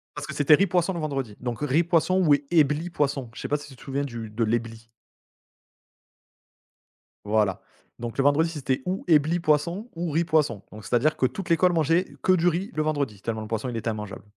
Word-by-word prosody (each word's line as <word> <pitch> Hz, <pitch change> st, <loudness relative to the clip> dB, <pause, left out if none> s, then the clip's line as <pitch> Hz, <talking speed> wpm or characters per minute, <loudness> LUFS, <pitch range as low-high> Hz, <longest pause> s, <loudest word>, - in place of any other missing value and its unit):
Parce -, -, -5 dB
que -, -, -6 dB
c'était 150 Hz, +1 st, +5 dB
riz-poisson 180 Hz, 0 st, +1 dB
le 170 Hz, -, -4 dB
vendredi. 135 Hz, -8 st, -3 dB
Donc, 120 Hz, -2 st, -4 dB
riz-poisson 170 Hz, +5 st, +2 dB
ou 145 Hz, -, +6 dB, 0.2 s
Ebly-poisson. 150 Hz, -4 st, +1 dB
Je -, -, -8 dB
sais -, -, -3 dB
pas 150 Hz, -, +1 dB
si 145 Hz, -, -11 dB
tu 135 Hz, -, -13 dB
te -, -, -16 dB
souviens 140 Hz, +1 st, -2 dB
du 115 Hz, -5 st, -6 dB
de 115 Hz, +2 st, -1 dB
l'Ebly? 115 Hz, 0 st, -2 dB, 2.4 s
Voilà. 105 Hz, -2 st, +1 dB, 0.4 s
Donc, 120 Hz, +1 st, -6 dB
le 135 Hz, -, +2 dB
vendredi, 145 Hz, +4 st, +3 dB
c'était 135 Hz, -5 st, -2 dB
ou 185 Hz, +2 st, -2 dB
Ebly-poisson 165 Hz, +5 st, +2 dB
ou 170 Hz, -1 st, -3 dB
riz-poisson. 155 Hz, -, +1 dB
Donc, 105 Hz, -2 st, -11 dB
c'est-à-dire 150 Hz, +9 st, +1 dB
que -, -, +2 dB
toute 170 Hz, +9 st, -4 dB
l'école 175 Hz, +2 st, +4 dB
mangeait 165 Hz, +3 st, +2 dB, 0.2 s
que 185 Hz, -, +4 dB
du 175 Hz, -1 st, +3 dB
riz 175 Hz, +4 st, 0 dB
le 155 Hz, -, -1 dB
vendredi, 140 Hz, -10 st, -2 dB
tellement 110 Hz, 0 st, -3 dB
le 110 Hz, -, -7 dB
poisson, 115 Hz, +2 st, -3 dB
il 120 Hz, -, -4 dB
était 115 Hz, 0 st, -2 dB
immangeable 105 Hz, -2 st, -6 dB
145 Hz, 190 wpm, -25 LUFS, 115-165 Hz, 2.4 s, ou